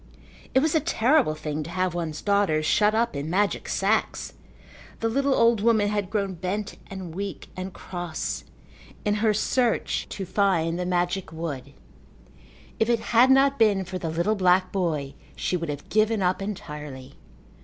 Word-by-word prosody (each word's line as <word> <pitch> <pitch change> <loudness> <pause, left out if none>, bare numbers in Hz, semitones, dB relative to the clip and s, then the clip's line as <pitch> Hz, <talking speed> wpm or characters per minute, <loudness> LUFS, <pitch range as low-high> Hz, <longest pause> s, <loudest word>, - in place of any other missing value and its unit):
It 265 - +6
was 315 +1 +1
a 320 - +4
terrible 275 - +2
thing 155 0 -4
to 155 - -6
have 185 0 -1
one's 165 -3 -4
daughters 200 -7 +2
shut 210 +6 +3
up 230 -5 +1
in 140 +2 -3
magic 200 +4 0
sacks. - - 0 0.7
The 225 - 0
little 270 +4 +1
old 230 -2 +4
woman 220 -2 +3
had 205 -3 -1
grown 200 -2 -1
bent 185 +4 -3
and 190 -4 -7
weak 195 +2 -5
and 185 +1 -5
cross 175 -3 -5 0.6
in 205 - +2
her 220 -1 +4
search 230 +2 0
to 195 - -5
find 175 -4 +1
the 180 - -2
magic 180 0 -1
wood. 145 -5 -5 1.1
If 220 - +2
it 235 -1 +3
had 240 +3 +7
not 275 0 +4
been 205 -4 +3
for 185 0 -5
the 165 - -3
little 170 +6 +1
black 185 -2 +3
boy 155 -8 -1 0.2
she - - -1
would 165 -3 -3
have 145 -1 -5
given 215 -1 +2
up 180 +2 +1
entirely. 150 -9 -7
190 Hz, 165 wpm, -25 LUFS, 165-215 Hz, 1.1 s, had